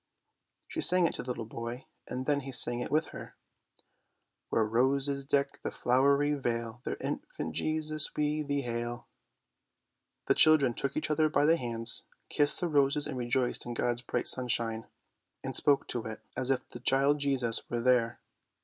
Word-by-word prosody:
She 330 - -4
sang 180 - +7
it - - 0
to - - -5
the - - -12
little 120 -2 -4
boy, 115 +3 -7 0.2
and 130 +1 -5
then 145 0 +1
he 135 -1 -8
sang 120 -1 +4
it - - -5
with 155 +2 0
her - - -11 0.4
— - - -30
" - - -53
Where 115 - +1
roses 135 +5 0
deck 140 0 -1
the - - -4
flowery 140 +4 +1
vale, 115 -4 -4
There, - - -4
Infant - - -6
Jesus, 155 -1 -1
we 150 +1 -1
thee 145 -1 -2
hail! 120 0 -5 0.6
" - - -55
The - - +3
children 150 -6 +5
took 140 +4 -3
each 155 - -2
other 155 0 +2
by 150 - +1
the 165 +2 +4
hands, 115 -5 +2 0.3
kissed 145 +2 +5
the 175 - 0
roses 145 -1 +2
and 145 - -5
rejoiced 125 0 -1
in 120 - -5
God's 120 0 -2
bright - - -3
sunshine, 115 -3 0 0.6
and - - -4
spoke 140 -1 +3
to 120 - -3
it 110 - -8
as 130 - -1
if 135 -2 -1
the 120 - -11
Child 135 +4 +2
Jesus 130 -5 -1
were 120 - -2
there. 120 -1 +1
135 Hz, 185 wpm, -29 LUFS, 120-145 Hz, 0.6 s, sang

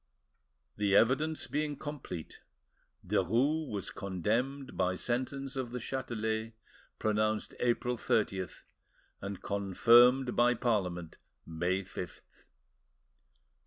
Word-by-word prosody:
The 100 -1 +2
evidence 150 +9 +3
being 150 -1 -2
complete, 140 - -7 0.6
Derues 135 - +1
was 100 -3 -4
condemned 115 - -2
by 90 0 +1
sentence 130 +5 -2
of 130 -3 -2
the 125 +1 -4
Chatelet, 110 -3 -3 0.4
pronounced 110 0 0
April 125 0 +1
30th, 95 -5 -1 0.6
and 100 -1 -6
confirmed 120 +6 +5
by 120 +1 +4
Parliament, 90 -9 -1 0.3
May 90 +4 -1
5th. 90 -3 -7
115 Hz, 90 wpm, -32 LUFS, 100-130 Hz, 0.6 s, confirmed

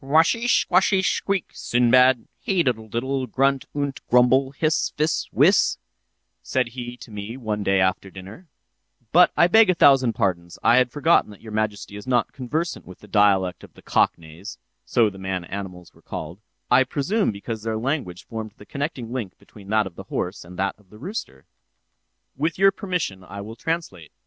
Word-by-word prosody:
"'Washish 165 - +3
squashish 190 +1 +2
squeak, 195 -1 -2
Sinbad, 125 0 +3
hey 190 -3 +1
diddle 115 -5 -1
diddle, 130 +4 -2
grunt 135 +3 +1
unt 140 -1 -3
grumble, 125 +2 +4
hiss, 155 +3 0
fiss, 155 +2 0
whiss,' - - +4 0.6
said 125 -2 -1
he 120 0 -7
to 120 - -13
me, 105 +4 -6
one 110 -4 -3
day 95 -1 +2
after 95 +1 0
dinner—but 120 - -2
I 170 - +6
beg 220 +3 +5
a 185 - +3
thousand 135 -7 +5
pardons, 90 -7 -2
I 120 - +5
had 125 -1 +4
forgotten 150 +2 +2
that 105 - -14
your 110 - -10
majesty 105 -1 -3
is 105 - -10
not 125 -1 +1
conversant 155 +7 -3
with 90 - -11
the 105 - -14
dialect 95 -3 +2
of - - -15
the - - -17
Cock - - +2
neighs 85 +7 -11 0.3
(so 115 -4 +2
the 95 - -12
man 95 -1 -3
animals 90 -2 -8
were 80 - -22
called; 90 +2 -7 0.3
I 125 +2 +6
presume 150 - 0
because 110 +2 -6
their 110 0 -2
language 115 - -3
formed 110 -2 -6
the 105 - -14
connecting 140 -4 -4
link 115 -8 -5
between 100 -2 -16
that 110 0 +2
of 95 - -8
the - - -10
horse 90 +2 -3
and 90 +1 -12
that 95 0 0
of 100 -3 -26
the 105 - -15
rooster). 135 - -7 0.9
With 160 +4 -1
your 195 +1 +5
permission, 180 - -3
I 100 +2 -8
will 110 +3 -8
translate. 115 - -4
115 Hz, 180 wpm, -23 LUFS, 100-140 Hz, 0.9 s, I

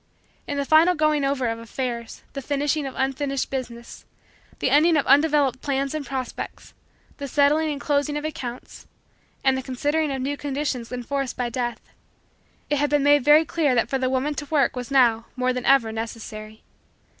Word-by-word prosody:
In 285 - -3
the 280 - -1
final 320 +5 +5
going 305 -2 +2
over 275 -2 0
of 230 -1 -2
affairs, 235 0 -5
the 275 - -5
finishing 290 +1 -1
of 265 - -8
unfinished 270 +1 -1
business, 240 -3 -6 0.5
the 260 - 0
ending 315 +3 +5
of 285 - +1
undeveloped 285 -3 +3
plans 275 0 -1
and 310 -1 -3
prospects, 265 -2 -6 0.4
the 280 - -5
settling 295 +3 +3
and 285 - -4
closing 290 0 0
of 295 - -4
accounts, 250 -5 -7 0.6
and 265 -1 +3
the 265 - -2
considering 290 +4 -1
of 270 - -3
new 280 +2 -2
conditions 275 -4 -3
enforced 255 +2 -3
by 245 -1 -1
Death, 240 0 -3 0.9
it 290 - 0
had 290 0 +1
been 290 -1 +2
made 290 -1 +5
very 300 +3 +6
clear 295 -4 +1
that 235 0 +1
for 270 - 0
the 255 0 0
woman 265 +3 0
to 290 - -5
work 280 -4 +1
was, 250 0 -5
now, 235 -4 +3
more 255 0 0
than 250 -1 -4
ever 265 -5 +4
necessary. 220 -1 -7
275 Hz, 180 wpm, -24 LUFS, 250-290 Hz, 0.9 s, very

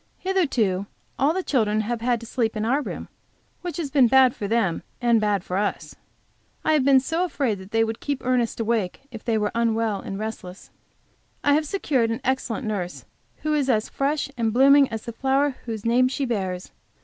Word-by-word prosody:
Hitherto 245 - 0 0.3
all 280 +3 +4
the 375 +3 -2
children 215 -8 +1
have 230 +1 -3
had 240 0 +1
to - - -8
sleep 230 -1 -1
in 215 - -1
our 270 +6 +2
room - - -6 0.5
which 355 -1 -5
has 305 -5 -3
been 265 -4 +5
bad 260 0 +5
for 205 - -4
them 205 -6 +1 0.2
and 235 -3 +3
bad 205 -3 +1
for 180 - -3
us. 205 +1 -2 0.7
I 315 - +3
have 300 -3 +3
been 270 0 +6
so 325 +6 -1
afraid 275 - -1
they 225 +1 +2
would 225 0 -3
keep 285 -3 -3
Ernest 250 -3 +1
awake 225 -4 -1
if 225 -2 -9
they 230 -2 +1
were 210 -1 0
unwell 225 -3 0
and 195 - -6
restless. 205 -3 -7 0.7
I 290 - +4
have 305 +1 +2
secured 275 -10 0
an 230 - -2
excellent 260 -1 -1
nurse, 195 -5 -4 0.4
who 305 0 0
is 285 -3 +1
as 220 -3 +1
fresh 285 +2 -1
and 225 -2 +1
blooming 275 +3 +6
as 220 -1 -5
the 235 - -6
flower 270 +2 +1
whose 220 -2 -5
name 245 +2 +4
she 270 +2 -2
bears. 190 -6 -3
235 Hz, 195 wpm, -24 LUFS, 220-275 Hz, 0.7 s, been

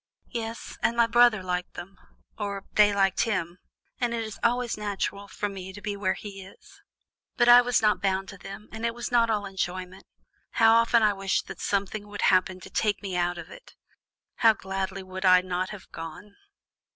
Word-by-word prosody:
"Yes, 230 -1 -6
and 235 - +1
my 235 - +6
brother 230 -3 +4
liked 180 -1 -3
them 185 +2 -10 0.4
or 200 -2 -4
they 210 -1 +5
liked 195 -2 +2
him 180 -5 -2 0.4
and 240 -1 0
it 230 - -2
is 220 -2 -8
always 240 0 +1
natural 200 -1 -3
for 205 - -3
me 190 -2 -7
to 205 - -9
be 205 0 -4
where 190 -2 0
he 195 -2 -9
is. 395 - -17 0.6
But 240 -2 +4
I 240 0 +10
was 245 -2 +1
not 210 -1 +3
bound 195 -1 0
to 195 - -10
them, 195 +3 -9
and 220 +1 -8
it 235 0 -1
was 240 - -5
not 235 -1 +4
all 210 -2 0
enjoyment. 185 -1 -5 0.5
How 225 -1 +5
often 230 0 +4
I 210 -1 +4
wished 195 0 -1
that - - -8
something 200 +1 -2
would 205 0 -5
happen 185 0 +3
to - - -10
take 210 -1 0
me 190 -2 -4
out 175 0 0
of - - -9
it! - - -14 0.6
How 225 -2 +6
gladly 190 -1 -4
would 185 0 -7
I 185 -1 +6
not 185 0 -2
have 205 -3 -10
gone!" 165 +5 -9
200 Hz, 200 wpm, -27 LUFS, 190-225 Hz, 0.6 s, I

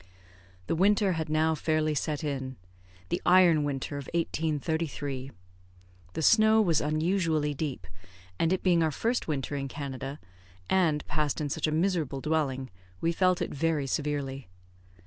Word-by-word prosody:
The - - -1
winter 200 +2 +3
had 160 -2 -2
now 155 +1 +2
fairly 155 0 0
set 150 +1 -2
in 135 -3 -3 0.5
the - - -1
iron 175 -4 +5
winter 140 0 -3
of 140 - -8
1833. 155 -4 -2 0.8
The - - -3
snow 220 +4 +6
was 170 -8 +3
unusually 155 0 +1
deep, 140 - -4 0.5
and 165 - +2
it 185 - 0
being 175 -3 +4
our 160 - +3
first 230 - -1
winter 145 -2 -2
in 140 -1 -3
Canada, 135 0 -6 0.5
and 165 -6 +2
passed 150 -2 -1
in 150 -2 -2
such 140 - -1
a - - 0
miserable 160 -4 0
dwelling, 135 -4 -1 0.3
we 165 - +1
felt 185 +1 +2
it - - -5
very 155 -1 0
severely. 140 - -2
155 Hz, 145 wpm, -28 LUFS, 140-165 Hz, 0.8 s, snow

